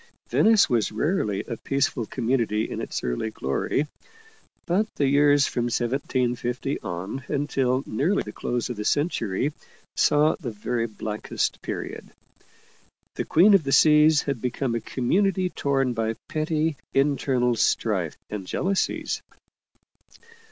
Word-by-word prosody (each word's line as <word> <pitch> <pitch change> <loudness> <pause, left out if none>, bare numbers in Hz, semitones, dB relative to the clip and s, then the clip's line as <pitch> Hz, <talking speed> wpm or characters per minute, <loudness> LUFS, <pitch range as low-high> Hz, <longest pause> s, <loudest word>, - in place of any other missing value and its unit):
Venice 220 -2 +5
was 120 -5 +1
rarely 110 - 0
a 115 - -6
peaceful 130 -4 -1
community 115 -3 0
in - - -5
its - - -4
early 60 - -2
glory. 90 - -1 0.8
But 195 +5 +1
the 145 - +1
years 145 0 +4
from 120 -1 -1
1750 125 +1 -1
on 95 +10 -5
until 135 -2 0
nearly 150 - 0
tlv 105 - -8
close 120 0 -2
of 120 - -6
the 105 - -3
century 145 - 0 0.4
saw 150 +1 +4
the 140 -9 -4
very 115 +2 -2
blackest 105 -1 -3
period. - - -6 1.0
The - - -3
Queen 190 +6 +5
of 195 -5 +5
the 135 - -2
Seas 150 +1 +6
had 140 -5 -3
become 125 0 -1
a 115 - -1
community 185 - 0
torn 135 -3 0
by 115 -1 -1
petty 155 -1 -1 0.2
internal 135 -3 +2
strife - - 0
and 100 -3 -6
jealousies. 190 - -1
130 Hz, 130 wpm, -25 LUFS, 115-150 Hz, 1.0 s, Seas